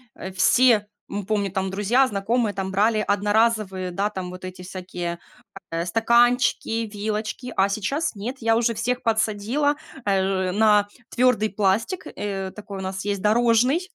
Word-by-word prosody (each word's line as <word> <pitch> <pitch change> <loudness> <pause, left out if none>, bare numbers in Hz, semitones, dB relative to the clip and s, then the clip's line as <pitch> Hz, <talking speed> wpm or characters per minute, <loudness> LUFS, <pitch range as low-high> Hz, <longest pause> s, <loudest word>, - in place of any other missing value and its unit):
э, 190 - -7
все- 220 +2 +4 0.2
мы 205 -1 -4
помню 205 -2 0
там, 190 -1 -2
друзья, 215 +7 +3
знакомые 215 0 0
там- 190 0 -3
брали 215 +3 +2
одноразовые, 205 -2 +1
да, 200 +4 -1
там 185 -3 -5
вот 185 +1 -10
эти 185 0 -8
всякие, 180 -2 -5 0.5
э, 165 +1 -2
стаканчики, 235 +2 +2
вилочки. 215 +4 -4
А 195 +1 +4
сейчас 245 +9 -2
нет. 235 +7 -5
Я 225 0 +2
уже 235 0 +2
всех 245 +3 -1
подсадила, 225 +6 +1 0.3
э, 190 -2 +1
на 210 0 +4 0.2
твёрдый 240 -4 +2
пластик, 210 - 0
э, 195 -2 -4
такой 205 -2 -8
у - - -5
нас 190 +1 -4
есть 200 -2 -2
дорожный. 235 - +3
210 Hz, 150 wpm, -23 LUFS, 190-230 Hz, 0.5 s, все